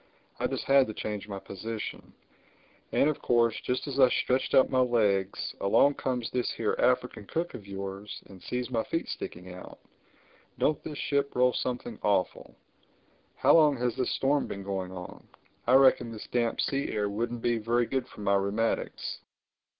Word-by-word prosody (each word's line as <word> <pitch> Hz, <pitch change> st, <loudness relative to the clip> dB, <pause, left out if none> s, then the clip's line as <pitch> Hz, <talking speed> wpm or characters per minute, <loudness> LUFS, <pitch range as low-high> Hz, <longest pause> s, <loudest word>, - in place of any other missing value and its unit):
I -, -, +1 dB
just -, -, -3 dB
had 135 Hz, -1 st, +5 dB
to 110 Hz, -, -6 dB
change 105 Hz, -1 st, -4 dB
my 100 Hz, -2 st, -5 dB
position; 110 Hz, +3 st, -6 dB, 0.8 s
and -, -, +3 dB
of 150 Hz, -, -1 dB
course 115 Hz, -2 st, +3 dB
just 125 Hz, -, -2 dB
as 140 Hz, -1 st, -3 dB
I 130 Hz, -2 st, +7 dB
stretched 130 Hz, +1 st, +1 dB
out 130 Hz, -, +5 dB
my 130 Hz, -, +3 dB
legs 105 Hz, -6 st, +1 dB
along 140 Hz, +8 st, +4 dB
comes 125 Hz, -4 st, -2 dB
this 125 Hz, -1 st, 0 dB
here 110 Hz, -, -1 dB
African 125 Hz, -4 st, +1 dB
cook 170 Hz, +2 st, -2 dB
of 100 Hz, -, -9 dB
yours 100 Hz, +1 st, -6 dB
and 95 Hz, -2 st, -14 dB
sees 125 Hz, +1 st, -3 dB
my 115 Hz, -2 st, +1 dB
feet 165 Hz, -, -2 dB
sticking 90 Hz, +1 st, -6 dB
out—Don't 145 Hz, +9 st, -6 dB
this 150 Hz, -2 st, -6 dB
ship 140 Hz, 0 st, -1 dB
roll 125 Hz, 0 st, +4 dB
something 120 Hz, -3 st, -3 dB
awful! 100 Hz, -3 st, 0 dB, 0.8 s
How -, -, +4 dB
long 150 Hz, -4 st, +5 dB
has 120 Hz, -1 st, -1 dB
this 130 Hz, -, -1 dB
storm 140 Hz, +1 st, +1 dB
been 100 Hz, -, -6 dB
going 95 Hz, -2 st, -3 dB
on? 90 Hz, -1 st, -9 dB, 0.4 s
I 125 Hz, -, +6 dB
reckon 130 Hz, -3 st, +5 dB
this 110 Hz, -2 st, -8 dB
damp 120 Hz, -2 st, +1 dB
sea 140 Hz, 0 st, -1 dB
air 105 Hz, -1 st, 0 dB
wouldn't 115 Hz, +3 st, -3 dB
be 120 Hz, -1 st, +1 dB
very 120 Hz, +2 st, +1 dB
good 130 Hz, 0 st, -2 dB
for -, -, -12 dB
my 100 Hz, -1 st, +2 dB
rheumatics." 100 Hz, +3 st, -1 dB
120 Hz, 175 wpm, -29 LUFS, 100-130 Hz, 0.8 s, I